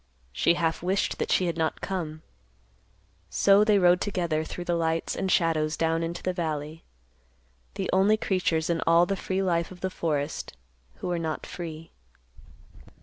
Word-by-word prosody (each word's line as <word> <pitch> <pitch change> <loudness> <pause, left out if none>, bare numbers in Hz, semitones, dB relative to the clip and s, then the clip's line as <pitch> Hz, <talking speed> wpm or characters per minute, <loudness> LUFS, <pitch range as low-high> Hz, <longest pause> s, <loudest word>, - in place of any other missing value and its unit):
She 170 - +3
half 165 -1 0
wished 185 +3 0
that - - -1
she 185 - +3
had 170 -2 -2
not 160 -1 0
come. 160 -5 -4 1.1
So 200 +1 +5
they 210 -1 +4
rode 180 -1 +4
together 170 -6 -1
through 175 - -6
the 175 - 0
lights 165 -1 0
and 190 -1 -1
shadows 155 -2 +2
down 165 0 +1
into 170 +1 -4
the 185 - 0
valley, 155 -2 -4 0.9
the - - -2
only 195 +3 +4
creatures 175 -6 0
in 170 -1 0
all 170 +1 +6
the 195 - -1
free 190 0 -2
life 170 -2 0
of 180 -1 -13
the 190 - -2
forest 150 - -3 0.4
who - - -6
were 175 -1 -1
not 160 -2 -3
free. 165 -2 -7
170 Hz, 165 wpm, -27 LUFS, 160-185 Hz, 1.1 s, all